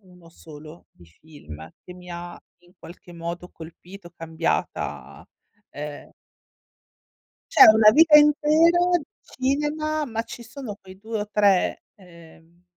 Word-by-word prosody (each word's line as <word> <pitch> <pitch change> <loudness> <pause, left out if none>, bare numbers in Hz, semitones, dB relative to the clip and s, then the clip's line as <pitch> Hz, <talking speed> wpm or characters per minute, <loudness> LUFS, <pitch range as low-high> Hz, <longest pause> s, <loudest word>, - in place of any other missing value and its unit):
uno 180 -3 -20
solo 155 0 -15
di 85 - -21
film 80 - -14
che 180 - -11
mi 180 0 -14
ha 175 0 -8 0.3
in 175 - -24
qualche 175 +1 -15
modo 170 +1 -8
colpito, 175 +3 -14
cambiata, 165 -1 -5 0.5
ehm 145 0 -9 1.4
C'è - - +8
una 215 0 +7
vita 310 +3 +6
intera 300 +3 +4 0.2
di - - -11 0.2
cinema, 300 +3 -2
ma 225 -3 -4
ci 235 0 -11
sono 225 -3 -9
quei 190 0 -15
2 220 0 -5
o 210 - -10
3, 200 -3 +1
ehm, 170 -2 -19
180 Hz, 125 wpm, -23 LUFS, 165-245 Hz, 1.4 s, C'è